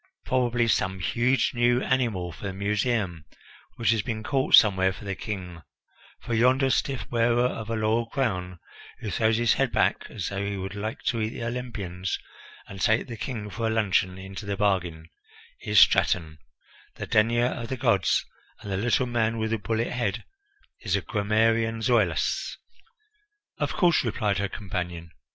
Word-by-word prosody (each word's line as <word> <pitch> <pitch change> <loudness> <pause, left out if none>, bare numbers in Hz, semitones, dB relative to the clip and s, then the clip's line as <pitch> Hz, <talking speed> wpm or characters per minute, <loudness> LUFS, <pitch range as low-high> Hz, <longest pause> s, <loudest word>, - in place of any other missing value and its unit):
Probably 120 -2 +1
some 95 -3 +1
huge 125 +9 +1
new 120 0 +3
animal 115 -9 0
for 85 - -10
the 95 - -3
Museum 100 -3 -1 0.5
which 115 - +2
has 115 -2 +2
been 110 -3 -4
caught 135 +2 +4
somewhere 95 -3 +5
for 100 - -10
the 100 - -2
King, 90 -5 -6 0.6
for 120 - -4
yonder 130 +4 +3
stiff 135 +2 -1
wearer 120 +1 +2
of 110 -3 -3
a 115 - -1
laurel 110 +2 +1
crown, 95 -9 -2 0.4
who 105 - -5
throws 110 +1 +2
his 120 -1 +3
head - - 0
back - - +1
as - - -4
though 100 0 -3
he 100 0 -3
would 95 0 -5
like 105 +2 -5
to 115 -2 0
eat 110 - 0
the 115 - -7
Olympians 110 -7 -4 0.5
and 95 -1 -9
take 110 -1 +3
the 115 - -7
King 105 -3 -5
for 115 +1 -2
a - - +1
luncheon 95 -4 +1
into 95 +2 -8
the 100 -1 -2
bargain, 90 -6 0 0.5
is - - +3
Straton, 80 -3 +3 0.6
the - - -5
denier 115 +2 +3
of 120 -2 -3
the 130 - -4
gods, 115 - +2 0.4
and 100 - -7
the 95 - -1
little 120 +5 +1
man 115 -2 0
with 110 0 -2
the 115 - 0
bullethead 115 +4 -2 0.6
is 100 -3 -1
the 100 - 0
grammarian 115 +3 +1
Zoilus." 105 -9 +1 1.0
"Of - - -1
course," 175 -4 +3
replied 105 -4 0
her 100 0 -1
companion. 90 -5 -5
110 Hz, 170 wpm, -26 LUFS, 95-120 Hz, 1.0 s, somewhere